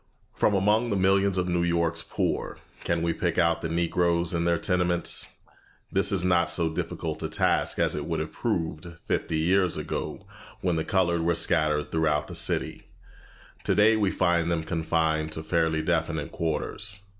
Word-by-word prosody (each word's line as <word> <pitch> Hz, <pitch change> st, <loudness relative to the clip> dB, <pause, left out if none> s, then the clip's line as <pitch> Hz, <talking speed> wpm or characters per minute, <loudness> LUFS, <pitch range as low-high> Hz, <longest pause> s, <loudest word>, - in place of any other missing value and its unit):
From 105 Hz, -, +2 dB
among 105 Hz, +5 st, +2 dB
the 105 Hz, -, 0 dB
millions 95 Hz, 0 st, +2 dB
of 90 Hz, 0 st, 0 dB
New 85 Hz, -1 st, 0 dB
York's 85 Hz, -1 st, 0 dB
poor, -, -, -2 dB, 0.3 s
can 85 Hz, -1 st, -1 dB
we 85 Hz, 0 st, +1 dB
pick 85 Hz, -1 st, -2 dB
out 85 Hz, -1 st, +2 dB
the 85 Hz, -, -3 dB
Negroes 85 Hz, 0 st, +1 dB
in 85 Hz, 0 st, 0 dB
their 85 Hz, 0 st, +2 dB
tenements? 90 Hz, -1 st, 0 dB, 0.6 s
This 95 Hz, +2 st, +2 dB
is 95 Hz, -3 st, +1 dB
not 90 Hz, -1 st, +3 dB
so 85 Hz, -2 st, +1 dB
difficult -, -, -4 dB
a -, -, -3 dB
task -, -, +1 dB
as -, -, +2 dB
it -, -, -3 dB
would -, -, -2 dB
have -, -, -4 dB
proved 80 Hz, +1 st, -3 dB, 0.2 s
fifty 80 Hz, -, -1 dB
years 90 Hz, +2 st, +2 dB
ago -, -, -5 dB, 0.4 s
when 90 Hz, -2 st, 0 dB
the 80 Hz, -, -1 dB
colored 85 Hz, -3 st, +1 dB
were 85 Hz, +1 st, +1 dB
scattered 75 Hz, -3 st, +1 dB
throughout 75 Hz, -2 st, +1 dB
the -, -, -9 dB
city; -, -, 0 dB, 0.8 s
today 110 Hz, +2 st, +4 dB
we 105 Hz, -3 st, +1 dB
find 85 Hz, -3 st, +1 dB
them 80 Hz, -1 st, 0 dB
confined 80 Hz, -1 st, 0 dB
to 80 Hz, -, -4 dB
fairly 80 Hz, -1 st, 0 dB
definite 80 Hz, -2 st, -1 dB
quarters. 90 Hz, +5 st, -3 dB
85 Hz, 170 wpm, -26 LUFS, 80-90 Hz, 0.8 s, today